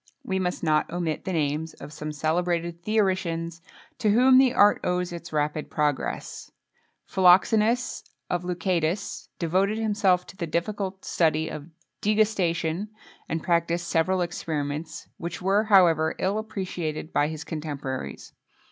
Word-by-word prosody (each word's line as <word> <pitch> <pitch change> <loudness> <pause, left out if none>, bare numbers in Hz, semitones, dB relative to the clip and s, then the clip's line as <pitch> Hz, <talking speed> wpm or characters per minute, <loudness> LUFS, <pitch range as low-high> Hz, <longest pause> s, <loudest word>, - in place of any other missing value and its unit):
We 190 -1 -1
must 180 -1 -2
not 155 -2 +2
omit 170 -2 -3
the 190 - -2
names 155 0 -1
of 140 +2 -10
some 155 0 -5
celebrated 170 +2 -1
theoricians, 175 -5 0 0.4
to 215 - +2
whom 255 +4 +6
the 265 -2 +5
art 205 -4 +5
owes 180 0 -1
its 170 0 -8
rapid 150 0 -1
progress: 150 -3 -2 0.6
Philoxenus 215 +6 +3 0.2
of 175 0 -1
Leucadus, 180 +1 -2
devoted 190 +5 +1
himself 205 -5 +2
to - - -13
the 170 -3 -4
difficult 190 +3 -3
study 160 -1 +1
of 150 +1 -7 0.3
degustation, 195 -4 +1 0.4
and 160 -1 -2
practised 170 0 +1
several 180 +3 +1
experiments, 155 -2 -4
which 170 0 -5
were, 195 +4 +2
however, 170 -6 +4
ill 200 +3 0
appreciated 180 -7 -4
by 145 - +3
his 155 0 -5
contemporaries. 145 -5 -5
170 Hz, 130 wpm, -26 LUFS, 160-195 Hz, 0.6 s, whom